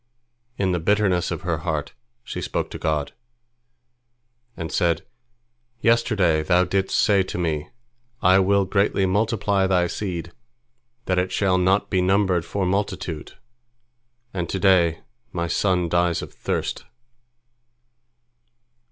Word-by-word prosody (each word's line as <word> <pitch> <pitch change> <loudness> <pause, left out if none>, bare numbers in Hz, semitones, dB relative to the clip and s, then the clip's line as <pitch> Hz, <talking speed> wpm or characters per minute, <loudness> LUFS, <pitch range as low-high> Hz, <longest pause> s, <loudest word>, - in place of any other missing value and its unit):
In 95 -2 +1
the 90 - 0
bitterness 95 0 +1
of 85 -3 -4
her 85 -3 -1
heart, 80 -3 -3 0.3
she - - -6
spoke - - -3
to - - -7
God, 75 -2 -1 1.5
and 80 -2 -5
said, 85 -1 +1 0.7
"Yesterday 105 -9 +2
Thou 90 +3 +3
didst 95 +1 0
say 100 -3 +4
to 95 - -4
me, 80 -4 -2 0.5
I 95 +1 +5
will 100 +1 +3
greatly 100 0 +1
multiply 100 0 +1
thy 90 -2 +2
seed, 85 -2 -4 0.7
that 90 -1 +1
it 90 0 -1
shall 95 -2 +2
not 95 +3 +2
be 95 - +2
numbered 95 -2 +2
for 95 +3 -2
multitude, 95 -4 -3 1.0
and 85 -3 -3
to - - -2
day 90 -4 +3 0.3
my 85 -2 -2
son 90 +1 +1
dies 85 0 +1
of - - -10
thirst." - - -3
90 Hz, 125 wpm, -23 LUFS, 85-100 Hz, 1.5 s, I